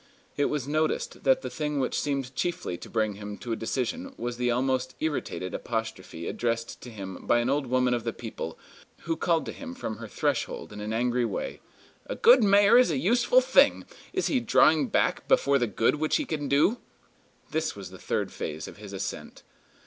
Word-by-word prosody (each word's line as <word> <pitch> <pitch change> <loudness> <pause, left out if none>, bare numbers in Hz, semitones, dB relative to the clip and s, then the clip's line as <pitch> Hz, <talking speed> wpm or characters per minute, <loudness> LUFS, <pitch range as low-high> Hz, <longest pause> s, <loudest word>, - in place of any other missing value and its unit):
It 145 - +2
was 145 -3 -2
noticed 155 +1 -1
that - - +4
the - - -3
thing 150 -2 -2
which 130 - 0
seemed 135 -3 -2
chiefly 170 - -2
to - - -10
bring 110 -2 0
him 105 0 -7
to 120 - -6
a - - +1
decision 140 - -3
was 120 0 -4
the 125 0 0
almost 130 +1 0
irritated 145 - -3
apostrophe 110 -7 -4
addressed 115 -1 -2
to 125 - -9
him 95 -5 -8
by 120 - +4
an 120 +2 +1
old 140 -1 0
woman 125 0 +2
of 120 -2 -1
the 115 - -1
people, 110 -8 -6 0.4
who 165 -1 -1
called 165 -1 +1
to - - -4
him 260 -2 -8
from 110 - -5
her - - -8
threshold, - - -2
in 105 - -7
an 105 +1 -4
angry 120 +2 +1
way: 115 -4 -3 0.5
"A - - -3
good 245 0 +6
mayor 205 +3 +6
is 250 - +4
a 155 - 0
useful 240 - +4
thing. - - +4 0.3
Is 375 0 -1
he 270 - +2
drawing 160 - +4
back - - 0
before 140 0 +4
the 120 - +1
good 115 +7 +1
which 155 +1 +1
he 300 - +1
can 150 - -3
do?" 150 - +3 0.7
This 160 0 -1
was 95 -3 -9
the 95 - -11
third - - -2
phase 80 0 -5
of - - -11
his 105 -1 -10
ascent. 95 - -6
130 Hz, 200 wpm, -27 LUFS, 115-160 Hz, 0.7 s, good